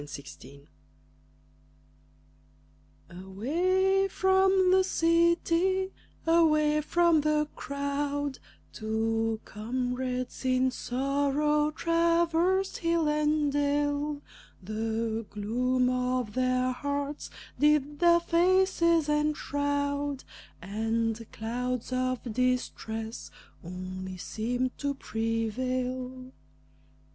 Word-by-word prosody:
THE 145 -1 -8 0.3
TRAVELERS 140 +1 -17 2.4
Away 350 - +1
from 380 -1 +3
the 375 0 +5
city, 340 +2 +2 0.3
away 305 -2 +3
from 340 0 +3
the 300 0 +1
crowd, 280 0 -3 0.3
Two 225 0 -1
comrades 250 +3 -3
in 255 0 +2
sorrow 285 +4 0
traversed 335 +3 +1
hill 335 -2 +1
and 300 -1 +1
dale; 290 0 0 0.4
The 220 +2 -2
gloom 250 +5 0
of 250 -3 -1
their 255 0 +1
hearts 285 +2 -3 0.3
did 295 -1 +2
their 340 -1 +5
faces 340 -2 +3
enshroud, 285 -1 -1 0.4
And 225 +3 -2
clouds 250 +3 -3
of 255 0 -1
distress 230 -2 -2 0.3
only 185 +1 -6
seemed 245 +7 -2
to 285 -1 -1
prevail. 255 +3 -3
280 Hz, 75 wpm, -28 LUFS, 235-310 Hz, 2.4 s, the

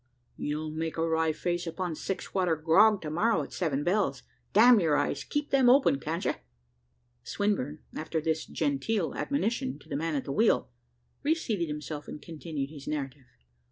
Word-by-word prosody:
You'll 155 +1 -3
make 160 +1 -3
a 165 0 +1
wry 160 0 +2
face 175 +2 -2
upon 175 +1 -3
six 190 +4 -5
water 180 -4 +2
grog, 185 +7 +4
to 155 - -4
morrow, 215 +8 +2
at - - -10
seven 145 -6 -1
bells. 175 -9 0 0.3
Damn 230 +2 +7
your 155 -5 +2
eyes, 145 - -1
keep 295 0 -3
them 265 -3 +5
open 255 - +5
can't 165 +5 -3
you?" - - +2 0.9
Swinburne, 155 -8 -1
after 160 +1 -2
this 160 0 -1
genteel 160 +6 -1
admonition 260 -1 -1
to - - -19
the 145 - -4
man 160 +1 -1
at 140 - -2
the - - -4
wheel, 220 - +2 0.5
reseated 280 - 0
himself 150 0 -5
and - - -7
continued 150 -2 -5
his 145 -3 -10
narrative. 140 -3 -4
160 Hz, 170 wpm, -29 LUFS, 150-205 Hz, 0.9 s, Damn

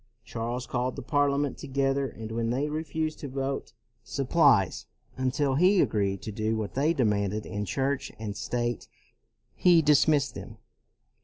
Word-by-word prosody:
Charles 120 +2 -4
called 125 0 -2
the 140 - -6
Parliament 145 0 +1
together, 135 0 0
and 110 -3 -8
when 115 0 -1
they 135 +5 0
re 155 +1 -2
fused 155 0 -3
to 145 - -5
vote 135 +1 -3 0.3
supplies 135 - +2 0.3
until 130 +2 0
he 180 +7 +4
agreed 100 - +1
to 110 - -4
do 110 +2 -1
what 105 -2 -4
they 145 +5 +2
demanded 105 - 0
in 105 -1 -4
Church 135 +7 -1
and 105 -2 -5
state 120 +1 -2 0.7
he 175 -2 +5
dismissed 145 -2 +3
them. - - -9
130 Hz, 150 wpm, -28 LUFS, 110-145 Hz, 0.7 s, he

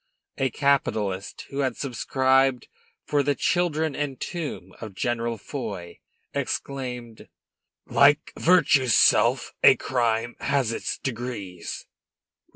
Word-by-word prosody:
A 135 - +2
capitalist 110 -9 -1
who 140 - -4
had 130 -4 0
subscribed 130 -1 +1 0.4
for 145 -1 +1
the 140 0 +1
children 160 -4 0
and 140 -3 -3
tomb 170 -5 -5
of 110 -4 -8
General 115 +1 -1
Foy 100 -8 -7 0.3
exclaimed: 125 -4 -4 0.6
"Like 145 +2 +4
Virtue's 140 - +4
self, - - +4
a - - +8
crime 120 -2 -1
has 135 -4 0
its 115 - -3
degrees." 115 -8 -5
130 Hz, 105 wpm, -25 LUFS, 115-140 Hz, 0.6 s, a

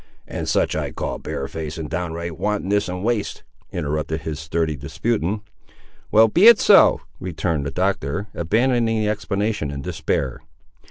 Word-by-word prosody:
"And - - -4
such - - +1
I - - -1
call - - -4
barefaced 75 +3 -5
and 80 -2 -4
downright 85 0 -4
wantonness 105 0 0
and 90 +1 -4
waste," 115 -2 -1 0.3
interrupted 75 +2 -2
his 80 -2 -4
sturdy 80 0 -1
disputant. 105 - -2 0.7
"Well, 110 +1 +6
be 175 - +5
it 235 -2 +9
so," - - +6 0.2
returned 80 -4 -2
the - - -1
Doctor, 95 0 -1
abandoning 115 +5 +1
the 105 -1 +1
explanation 100 -4 -1
in 70 -1 -5
despair. 65 -2 -2
90 Hz, 145 wpm, -22 LUFS, 80-105 Hz, 0.7 s, it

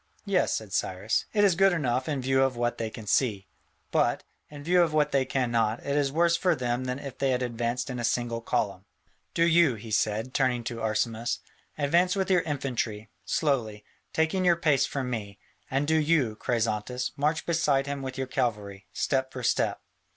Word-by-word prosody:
"Yes," - - +2
said - - -6
Cyrus, - - 0
"it 205 -2 +2
is 200 -3 +5
good 195 +3 +4
enough 130 -4 0
in 140 -4 -2
view 135 +1 +2
of 135 -1 +2
what 120 0 -1
they 115 -1 -2
can 110 -1 -9
see, 105 -2 +1 0.5
but, - - +1 0.3
in 145 -1 -10
view 175 +3 +4
of 165 -3 +2
what 150 -1 +2
they 135 -1 +2
cannot, 120 -4 0
it 140 - -1
is 145 -2 +1
worse 170 +3 +3
for 180 +2 +2
them 125 0 -2
than 125 0 -2
if 140 -2 -8
they 135 - +1
had 125 -1 +1
advanced 120 +1 -2
in 125 -2 -4
a - - -3
single 120 0 -1
column. 100 -4 -2 0.5
Do 165 - +3
you," 170 -6 +4
he 110 +1 -9
said, 110 +4 0
turning 125 -3 +1
to 115 0 -5
Arsamas, 110 +2 -1 0.4
"advance 170 +6 +2
with 190 -1 0
your 180 -2 +5
infantry, 120 -8 -3
slowly, 110 -9 -1 0.3
taking 160 +4 +1
your 175 -1 +5
pace 150 -5 +2
from 135 -2 -3
me, 100 -4 -5 0.3
and 135 +2 0
do 160 +1 +3
you, 150 -8 +2
Chrysantas, 115 +2 -1
march 150 +3 0
beside 150 -5 +2
him 140 -1 -4
with 130 -1 -5
your 130 - -1
cavalry, 105 -7 -3
step 130 -1 0
for 125 -2 -7
step. - - 0
130 Hz, 195 wpm, -27 LUFS, 115-150 Hz, 0.5 s, is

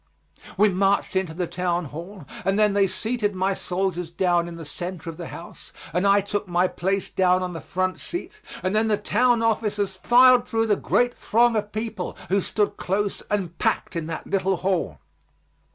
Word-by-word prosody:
We 210 - +6
marched 195 +1 +1
into 185 -4 -1
the 180 +1 -1
town 175 0 -1
hall 170 +5 -9 0.2
and 195 +1 +1
then 210 -1 +4
they 200 -1 +3
seated 210 +1 -2
my 190 +1 +1
soldiers 180 -2 -2
down 175 0 +1
in 170 - -7
the 165 -1 -8
center 175 +2 -5
of 160 - -14
the 170 -2 -6
house 170 - -11 0.2
and 180 +4 +2
I 200 +1 +5
took 205 0 -3
my 175 +1 +2
place 190 +2 -1
down 185 0 +2
on 180 -1 -4
the 165 - -6
front 185 +4 -2
seat, 385 +4 -7 0.2
and 185 - 0
then 220 +1 +3
the 210 -1 +2
town 235 +2 +2
officers 210 -3 0
filed 250 +5 +5
through 225 -1 +1
the 210 -2 +3
great 245 +4 +1
throng 235 +1 +2
of 210 -1 -1
people, 215 -4 -4
who 195 +1 +2
stood 210 +3 -1
close 200 +2 -1
and 185 -5 -1
packed - - 0
in 165 -2 -3
that 165 - -5
little 195 -1 +1
hall. 185 -1 -1
195 Hz, 190 wpm, -24 LUFS, 180-210 Hz, 0.2 s, We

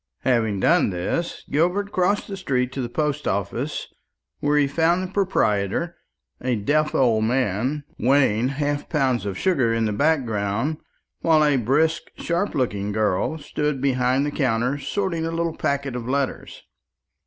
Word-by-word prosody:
Having 110 -6 +1
done - - +4
this, 95 - -3
Gilbert 180 +7 +1
crossed 200 +2 +1
the 195 -2 -7
road 125 -1 +1
to 135 - -4
the 120 - -3
post 150 +2 -1
office, 100 -2 -2 0.5
where 145 +1 +2
he 145 - +4
found 165 +5 +1
the 185 0 -7
proprietor, 170 - 0 0.5
a 125 -1 0
deaf 150 +8 +1
old 115 -4 +3
man, 125 +4 0 0.2
weighing 125 -2 +3
half 145 +1 -2
pounds 130 -8 +1
of 95 -2 -3
sugar 135 - +2
in 115 0 +1
the 105 - -1
background, 120 -1 0 0.4
while 155 -2 +4
a 145 -1 +3
brisk 150 +7 +2 0.2
sharp 175 +4 -1
looking 105 -7 -1
girl 105 +7 0
stood 150 -1 -2
behind 130 0 +1
the 145 - -2
counter 125 0 0
sorting 170 +4 -2
a 165 - -1
little 165 0 -2
packet 140 -2 -1
of 120 0 -4
letters. 140 0 -2
135 Hz, 155 wpm, -23 LUFS, 115-160 Hz, 0.5 s, done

